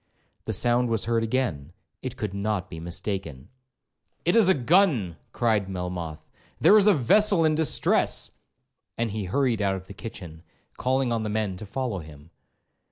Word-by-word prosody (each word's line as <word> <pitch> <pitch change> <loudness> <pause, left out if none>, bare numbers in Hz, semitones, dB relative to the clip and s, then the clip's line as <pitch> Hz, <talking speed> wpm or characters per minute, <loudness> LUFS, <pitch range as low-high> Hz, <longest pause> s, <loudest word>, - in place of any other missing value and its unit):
The - - -2
sound 120 0 +2
was 115 -3 0
heard 115 0 +1
again,—it 115 - -4
could 105 -6 -4
not 100 -1 -2
be 80 - -7
mistaken. 85 -4 -5 0.8
'It 175 - +2
is 220 -5 +5
a 190 - +5
gun,' 135 - +2 0.2
cried 110 -5 0
Melmoth; 90 -4 -5 0.3
'there 210 - +6
is 210 -1 +5
a 210 - +7
vessel 170 - +4
in 155 - +3
distress!' 155 0 +1 0.7
and 115 -2 -1
he 105 -1 -4
hurried 120 +3 0
out 100 -1 +1
of 95 -1 -8
the 100 - -10
kitchen, 90 -6 -9 0.3
calling 130 -1 0
on 115 -1 0
the 110 - -3
men 105 -3 -1
to 105 +2 -9
follow 125 -3 -3
him. 75 0 -13
110 Hz, 165 wpm, -25 LUFS, 90-130 Hz, 0.8 s, a